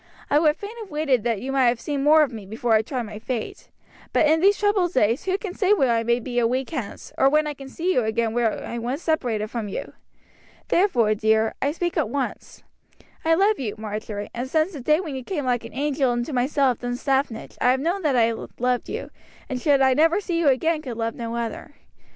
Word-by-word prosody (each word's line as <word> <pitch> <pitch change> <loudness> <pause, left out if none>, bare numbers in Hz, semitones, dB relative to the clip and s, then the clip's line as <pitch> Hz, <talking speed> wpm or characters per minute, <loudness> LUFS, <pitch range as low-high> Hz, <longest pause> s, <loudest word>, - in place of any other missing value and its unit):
I 290 - +5
would 305 -1 +3
fain 415 +3 -8
have 430 -3 -8
waited 295 -7 +1
that 230 -4 0
you 265 - -4
might 265 -2 +3
have 240 -1 +2
seen 285 0 -3
more 305 +1 +6
of 280 - -2
me 215 -4 -8
before 225 +3 -1
I 215 - +5
tried 250 +2 -4
my 215 -1 -8
fate; 240 0 -5 0.4
but - - +4
in 315 +2 +4
these 400 +2 +5
troubled 405 -4 +1
days 230 +3 +2
who 380 0 +1
can 400 -3 -6
say 390 +1 +3
where 265 - +3
I 230 - +1
may 235 +1 +1
be 245 0 -2
a 235 - +3
week 260 +4 -2
hence, 250 -10 -6
or 270 - +6
when 305 +2 +3
I 300 - -3
can 275 -1 -11
see 350 +7 -1
you 250 - +2
again 220 +1 0
were 235 -2 +2
I 235 - -5
once 250 +7 -3
separated 235 -10 -1
from 230 -3 -3
you! 195 - -6 0.8
Therefore, 250 - +3
dear, 220 +1 +2
I 280 - +1
speak 345 +2 -3
at - - +1
once. 275 +2 -4 0.6
I 325 0 +4
love 400 +4 +3
you, 225 -6 -3
Marjory, 210 -1 -5
and 245 +2 -4
since 315 +5 +1
the 285 - -7
day 305 +5 +3
when 330 -6 -5
you 260 -1 -5
came 300 -2 -3
like 245 -2 0
an - - -10
angel 280 -2 +1
into 240 +4 -3
my 250 0 +1
cell 280 -3 +2
at 240 - -6
Dunstaffnage 250 0 -2
I 250 - +4
have 260 +1 +3
known 345 +7 -1
that 295 -6 +1
I 230 -1 +4 0.3
loved 250 0 0
you, - - -5 0.4
and 255 -2 -3
should 280 -1 +3
I 265 -1 +5
never 325 +7 +3
see 350 -4 -2
you 330 - +2
again 305 +4 +2
could 250 -6 -6
love 230 0 -1
none 230 -1 -5
other. 235 +5 -5
265 Hz, 240 wpm, -24 LUFS, 235-310 Hz, 0.8 s, more